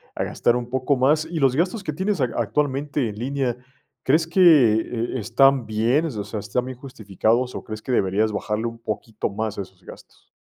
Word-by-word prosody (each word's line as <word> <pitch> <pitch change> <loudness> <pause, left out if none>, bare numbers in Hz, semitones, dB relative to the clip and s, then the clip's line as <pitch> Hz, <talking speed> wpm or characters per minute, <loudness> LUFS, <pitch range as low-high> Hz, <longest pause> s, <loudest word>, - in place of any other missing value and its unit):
a - - -1
gastar 120 - +1
un 120 0 -3
poco 130 +2 +1
más. 150 +5 +3
Y 170 - -3
los 135 -2 +3
gastos 185 +6 0
que 155 - -3
tienes 190 +2 -1
ac 125 -3 0
actualmente 135 +2 -1
en 105 - -7
línea, 125 +1 -2 0.5
¿crees 155 +5 +3
que, 185 +3 +1
eh, 120 -6 +4
están 130 +3 +3
bien, 120 +9 +1
o 105 -8 -4
sea, 105 +1 -5
están 105 +5 -2
bien 130 -1 -7
justificados 120 0 -1
o - - -6
crees 110 0 -7
que 130 - -4
deberías 105 0 +1
bajarle 105 +2 -2
un 115 0 -5
poquito 110 -1 -4
más 110 +1 -4
a - - 0
esos 95 -1 -13
gastos? - - -15
125 Hz, 200 wpm, -23 LUFS, 110-140 Hz, 0.5 s, eh